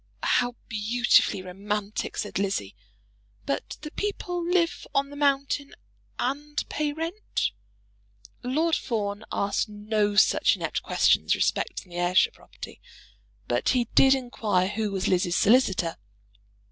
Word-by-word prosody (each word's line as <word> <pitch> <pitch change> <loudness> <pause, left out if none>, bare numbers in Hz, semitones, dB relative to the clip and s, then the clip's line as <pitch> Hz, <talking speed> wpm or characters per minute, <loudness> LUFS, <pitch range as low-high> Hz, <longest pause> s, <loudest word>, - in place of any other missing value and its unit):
"How 245 0 +2
beautifully 220 -2 +2
romantic!" 200 +3 -4
said 205 - -3
Lizzie. 190 - -2 0.7
"But 135 - -3
the 300 -1 -7
people 355 -4 -3
live 340 -1 0
on 275 0 +1
the - - -9
mountain 280 0 0 0.4
and 290 +4 -2
pay 300 -1 -1
rent?" 330 +7 -2 0.9
Lord 315 +6 +1
Fawn 205 -2 -3
asked 200 +2 0
no 210 0 -1
such - - +4
inept - - -3
questions - - +3
respecting 180 - -1
the 175 - -5
Ayrshire 175 +1 +3
property, - - -12 0.7
but - - 0
he 240 -2 0
did 270 0 +6
inquire 215 -7 0
who 215 +1 -2
was 190 -1 -1
Lizzie's 180 -1 +1
solicitor. 195 -7 +3
225 Hz, 120 wpm, -26 LUFS, 200-285 Hz, 0.9 s, did